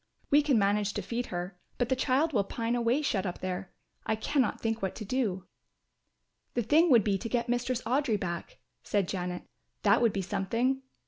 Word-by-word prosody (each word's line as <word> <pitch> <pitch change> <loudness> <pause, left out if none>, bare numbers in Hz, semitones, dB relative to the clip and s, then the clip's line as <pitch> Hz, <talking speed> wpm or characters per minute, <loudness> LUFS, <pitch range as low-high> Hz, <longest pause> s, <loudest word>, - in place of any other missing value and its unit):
We 290 +1 +7
can 285 -4 +2
manage 205 0 +2
to - - -3
feed 240 +1 -3
her, 180 +1 -5 0.2
but 245 -1 0
the 260 - +3
child 275 +4 +1
will 205 -5 +3
pine 230 +4 -2
away 240 +5 +1
shut 195 -8 0
up 175 - -4
there. 185 0 -4 0.3
I 220 - 0
cannot 255 +2 0
think 225 0 -1
what 190 -1 -2
to 215 - -6
do." 200 -6 -1 1.1
"The 240 - +1
thing 315 +9 +4
would 235 -6 +6
be 195 -2 +1
to 230 - -5
get 240 0 0
Mistress 245 0 -1
Audry 245 -3 +1
back," 175 -2 -5 0.2
said 200 -3 0
Janet. 180 -1 -3 0.4
"That - - +5
would 230 -2 +4
be 195 -1 -2
something." 240 +9 0
230 Hz, 195 wpm, -30 LUFS, 195-255 Hz, 1.1 s, We